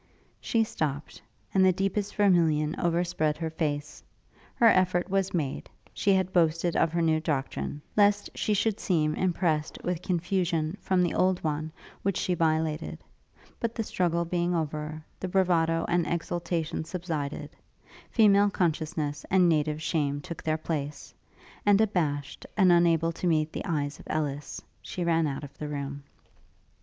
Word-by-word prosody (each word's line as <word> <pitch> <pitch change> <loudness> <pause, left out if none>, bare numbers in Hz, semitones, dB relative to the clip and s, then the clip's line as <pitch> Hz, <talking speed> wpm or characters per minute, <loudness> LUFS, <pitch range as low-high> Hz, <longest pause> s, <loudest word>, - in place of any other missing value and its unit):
She 225 -1 +1
stopt, 150 -8 -4 0.3
and 190 - +4
the 190 - +6
deepest 195 +2 -2
vermillion 165 -6 +3
overspread 170 -3 0
her 160 0 -3
face; 150 -2 -3 0.5
her 235 - +3
effort 185 -3 +3
was 195 -1 +1
made; 150 -6 -3 0.2
she 200 - +1
had 190 -1 +1
boasted 165 0 +2
of 165 - +2
her 170 0 0
new 160 -1 +3
doctrine, 145 -1 -3
lest 205 0 +4
she 210 - 0
should 215 +1 0
seem 155 -5 +1
impressed 165 -3 0
with 180 -1 -2
confusion 175 -2 0
from 185 -1 +2
the 175 - 0
old 185 -1 +2
one 155 0 -2 0.3
which 195 -2 0
she 180 - 0
violated; 160 -1 -1 0.6
but 230 0 -2
the 225 - -1
struggle 170 -4 0
being 175 +1 0
over, 155 -1 -3
the 185 - -3
bravado 170 -3 +2
and 175 -1 +1
exultation 170 -1 -2
subsided; 160 -4 -4 0.6
female 205 -2 +5
consciousness 155 -5 -1
and 185 -1 +5
native 155 -2 +1
shame 145 -4 0
took 170 +3 -7
their 155 0 0
place; 150 -3 -4 0.5
and 205 -1 +5
abashed, 155 -10 0
and 190 -3 +6
unable 165 -1 +4
to 170 +2 -3
meet 155 -2 +1
the - - -4
eyes 145 -5 -2
of - - -13
Ellis, 150 -2 -3 0.2
she 180 - -4
ran 165 -2 +2
out 140 +1 -4
of 140 0 -10
the 150 - -4
room. 140 -1 -4
165 Hz, 150 wpm, -28 LUFS, 155-185 Hz, 0.6 s, the